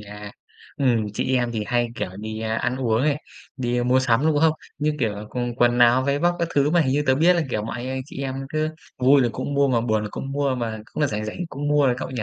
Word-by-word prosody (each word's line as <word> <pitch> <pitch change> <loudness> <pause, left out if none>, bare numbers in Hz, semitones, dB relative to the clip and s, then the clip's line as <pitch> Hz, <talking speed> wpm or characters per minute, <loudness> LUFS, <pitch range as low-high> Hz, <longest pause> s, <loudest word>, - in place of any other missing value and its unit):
nha. 105 0 -9 0.5
Ừm, 120 -6 +2
chị 130 - 0
em 120 -1 0
thì 110 -2 -2
hay, 120 -1 +1
kiểu, 90 - -4
đi, 110 0 -5
a, 110 0 -2
ăn 120 +3 -1
uống 120 -2 +1
này, 150 -1 0 0.3
đi 120 -1 -1
mua 125 +1 +3
sắm, 125 -2 +2
đúng 155 -2 +2
hông? 160 0 +4 0.3
Như 150 +1 +1
kiểu 110 -4 +1
là, 105 +1 -7
còn 120 -1 -3
quần 120 0 +3
áo, 120 +2 +5
váy 140 +1 0
vóc 175 +2 +1
các 170 -1 -1
thứ, 145 +1 +3
mà 175 0 +4
hình 130 -3 +1
như 145 +1 +1
tớ 130 - +4
biết 165 +6 +5
là, 165 - +2
kiểu 105 -2 -1
mà, 110 - -5
anh 120 +2 -5
anh 130 0 -3
chị 140 - -7
em 130 -1 -3
cứ 155 +1 -1 0.3
vui 135 +2 +5
là 120 - +2
cũng 145 - -4
mua, 140 0 +3
mà 120 -3 +2
buồn 110 -2 0
là 105 - -4
cũng 135 0 -6
mua, 140 -2 0
mà 115 -3 -3
cũng - - -4
là 145 - +4
rảnh 105 -3 -3
rảnh 110 - -6
cũng 145 0 -4
mua 145 -1 +4
đấy 125 -1 +2
cậu - - -5
nhỉ? 125 -4 -3
130 Hz, 290 wpm, -23 LUFS, 115-140 Hz, 0.5 s, áo